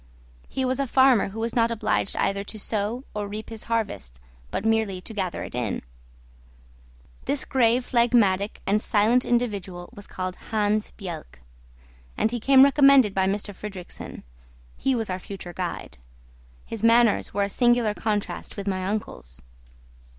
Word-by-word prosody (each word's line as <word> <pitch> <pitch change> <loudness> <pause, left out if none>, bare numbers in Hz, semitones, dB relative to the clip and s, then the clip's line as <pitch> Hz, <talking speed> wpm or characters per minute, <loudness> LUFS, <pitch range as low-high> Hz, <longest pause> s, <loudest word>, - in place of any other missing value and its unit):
He 265 - -2
was 255 +1 0
a 275 - 0
farmer 260 -5 +4
who 215 +3 -8
was 230 +1 -2
not 230 -1 +3
obliged 225 -3 -1
either 200 0 0
to 215 - -9
sow 215 +4 -2
or 210 -1 -3
reap 210 +1 -7
his 225 -1 -5
harvest, 205 - -3 0.3
but 200 - -3
merely 220 -4 +1
to 205 +5 -8
gather 190 -5 -3
it - - -8
in. 120 -4 -2 1.4
This 285 - 0
grave, 245 -1 +2
phlegmatic, 225 -5 +2
and 210 +2 +2
silent 225 +5 +2
individual 200 -7 -2
was 205 - -11
called 185 -1 -5
Hans 215 -1 +1
Bjelke; 170 - -8 0.8
and 220 - +1
he 240 - -2
came 265 +3 +6
recommended 275 -6 +6
by 190 -1 +2
M. 195 - +2
Fridrikssen. 200 -2 -8 0.5
He 265 - 0
was 225 -5 -2
our 185 - -3
future 185 -2 -8
guide. 175 - -5 0.7
His 225 - -6
manners 230 -1 +4
were 200 - 0
a - - 0
singular 240 -1 +3
contrast 210 -1 -3
with 200 - -4
my 190 -2 -1
uncle's. 70 - -5
210 Hz, 155 wpm, -25 LUFS, 195-235 Hz, 1.4 s, came